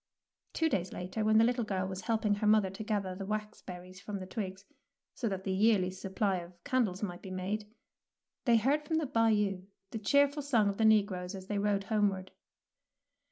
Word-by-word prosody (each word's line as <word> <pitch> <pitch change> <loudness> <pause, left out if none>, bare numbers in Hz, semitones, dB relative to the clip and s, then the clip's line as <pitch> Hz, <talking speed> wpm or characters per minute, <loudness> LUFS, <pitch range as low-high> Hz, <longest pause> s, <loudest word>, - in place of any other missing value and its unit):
Two 325 - +2
days 190 - -1
later, 185 +5 -4
when 215 0 +4
the 225 - +7
little 245 +1 +2
girl 190 -3 -1
was 190 0 -5
helping 220 -1 +1
her 205 +1 0
mother 210 -3 +4
to 195 +3 -6
gather 205 -4 -1
the 190 +2 -6
wax 210 +1 -4
berries 180 0 -10
from 205 +2 -5
the 185 - -6
twigs, 190 -1 -5 0.5
so 235 - -2
that 190 -1 -4
the 190 - -2
yearly 195 -2 +3
supply 190 +1 -1
of 175 0 -8
candles 220 -7 0
might 175 -3 -4
be 190 - -8
made, 200 +3 -3 0.7
they 235 -3 +5
heard 275 +7 +2
from 315 +2 -1
the 320 - 0
Bayou 215 -6 +2 0.3
the 225 - -4
cheerful 285 +6 +3
song 235 -8 +2
of 200 - -3
the 220 - +3
negroes 200 -3 +2
as 190 -1 -8
they 205 +1 -2
rowed 200 -1 +1
homeward. 200 -3 0
205 Hz, 200 wpm, -32 LUFS, 190-220 Hz, 0.7 s, the